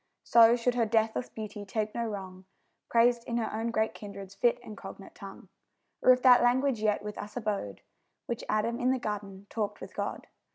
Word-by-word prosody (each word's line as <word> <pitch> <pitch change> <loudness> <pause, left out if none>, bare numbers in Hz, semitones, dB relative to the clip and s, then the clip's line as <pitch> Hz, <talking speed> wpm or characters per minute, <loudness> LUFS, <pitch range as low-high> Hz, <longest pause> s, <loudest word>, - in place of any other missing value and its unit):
So 235 0 +6
should 245 +1 0
her 235 -2 +1
deathless 220 +2 0
beauty 210 -1 -7
take 215 +1 -3
no 235 - -2
wrong, 190 -3 -7 0.4
Praised 235 0 +3
in 235 - -2
her 230 - -2
own 225 +2 -2
great 220 -1 0
kindred's 200 -2 -9
fit 235 +4 +2
and 215 - -9
cognate - - -10
tongue. - - -11 0.5
Or 255 - +7
if 250 0 +3
that 250 -2 +8
language 250 0 +2
yet 210 -1 +1
with 210 0 -6
us 210 +3 -7
abode 205 - -3 0.4
Which 235 - -4
Adam 230 +3 0
in 250 - +1
the 260 - +2
garden 200 -4 -5
talked 215 -3 -3
with - - -10
God! - - -4
220 Hz, 195 wpm, -29 LUFS, 210-240 Hz, 0.5 s, that